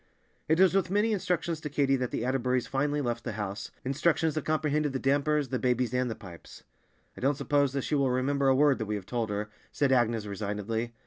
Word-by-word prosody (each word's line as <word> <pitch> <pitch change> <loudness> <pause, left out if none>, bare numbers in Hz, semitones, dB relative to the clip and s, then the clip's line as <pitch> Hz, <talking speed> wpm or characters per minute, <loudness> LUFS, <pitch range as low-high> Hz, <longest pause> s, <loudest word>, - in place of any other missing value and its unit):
It 160 +2 +2
was 190 -1 +6
with 195 -2 +1
many 210 +4 +2
instructions 175 -4 -1
to 150 - -4
Katy 140 -1 +2
that 125 -1 -2
the - - -3
Atterburys 130 -1 0
finally 145 +2 0
left 120 -3 -2
the 120 - -4
house, 100 -2 -4 0.2
instructions 155 +4 +1
that 155 -1 -3
comprehended 150 -2 0
the - - 0
dampers, 145 +1 +1
the 130 - -1
babies, 125 -1 0
and 125 0 +1
the 110 - -4
pipes. 90 -6 -12 0.5
"I - - -11
don't 135 +2 +1
suppose 140 -1 +1
that 140 -2 -1
she - - -3
will 140 -2 +2
remember 135 +2 +1
a 135 - +5
word 145 -1 +4
that 110 - -3
we 105 - -1
have 100 -3 -6
told 115 -1 -2
her," 105 +1 -3 0.2
said 140 -2 +1
Agnes 115 -4 +2
resignedly. 105 +3 -3
135 Hz, 220 wpm, -29 LUFS, 115-145 Hz, 0.5 s, was